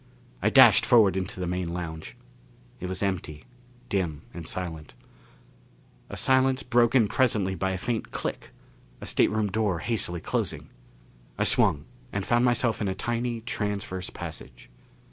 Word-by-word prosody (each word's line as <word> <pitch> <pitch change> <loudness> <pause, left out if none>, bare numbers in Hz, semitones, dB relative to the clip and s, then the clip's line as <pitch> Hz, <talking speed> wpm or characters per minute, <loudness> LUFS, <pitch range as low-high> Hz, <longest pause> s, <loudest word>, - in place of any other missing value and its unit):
I - - +3
dashed - - +7
forward 105 -6 +5
into 95 0 -4
the 90 - -2
main 90 0 -2
lounge. 80 -2 -6 0.6
It 90 - -5
was 95 +3 -3
empty, 95 -6 -3 0.4
dim 85 -7 -2
and 85 -2 -8
silent, 80 -5 -5 1.1
a - - -7
silence 130 0 +3
broken 120 -1 +3
presently 105 -6 +1
by 95 0 -1
a 95 - -2
faint 115 +3 -3
click, - - -5 0.5
a - - -8
stateroom 105 -2 +1
door 105 -3 0
hastily 90 -3 -2
closing. - - -3 0.7
I - - +1
swung 75 -2 +3 0.3
and 100 -1 -3
found 120 0 +2
myself 120 -2 +2
in 105 - 0
a 95 - -2
tiny 120 +2 -2
transverse 105 -5 -3
passage. 60 -1 -9
100 Hz, 145 wpm, -26 LUFS, 90-115 Hz, 1.1 s, dashed